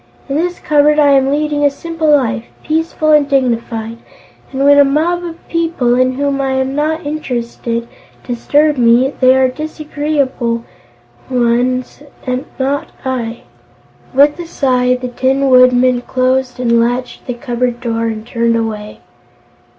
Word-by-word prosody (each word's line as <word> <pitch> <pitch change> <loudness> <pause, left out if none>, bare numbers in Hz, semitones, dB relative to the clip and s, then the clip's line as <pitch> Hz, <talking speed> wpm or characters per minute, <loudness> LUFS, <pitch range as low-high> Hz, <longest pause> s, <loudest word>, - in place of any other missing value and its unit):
"In - - -4
this 350 +3 -1
cupboard 300 0 +2
I 290 -2 +5
am 270 -1 +3
leading 295 0 0
a 285 - +5
simple 325 +2 -3
life, 250 -6 +2 0.2
peaceful 315 0 0
and 295 -2 +4
dignified, 235 -4 -1 0.5
and 270 0 -1
when 285 0 +6
a - - +8
mob 320 +6 0
of 335 -1 -9
people 330 -7 0
in 255 +1 +2
whom 280 +1 -1
I 270 -1 -1
am 265 0 -1
not 310 +2 -1
interested 235 -5 -4 0.4
disturb 290 +5 +1
me, 245 +3 +3
they 255 0 +5
are 265 0 +4
the 255 - -6
disagreeable 290 -6 -2 0.7
ones; 250 +1 0 0.6
not 275 +2 -2
I." 240 -3 -3 0.7
With 290 +4 +3
a 345 - -6
sigh 250 -5 +1
the 250 0 -5
Tin 265 +2 0
Woodman 255 0 +5
closed 255 0 -1
and 235 -2 +2
latched 245 +3 -2
the 250 - -3
cupboard 245 -1 -2
door 230 -1 -2
and 220 -1 -5
turned 235 -1 0
away. 215 -2 -4
260 Hz, 145 wpm, -15 LUFS, 245-290 Hz, 0.7 s, a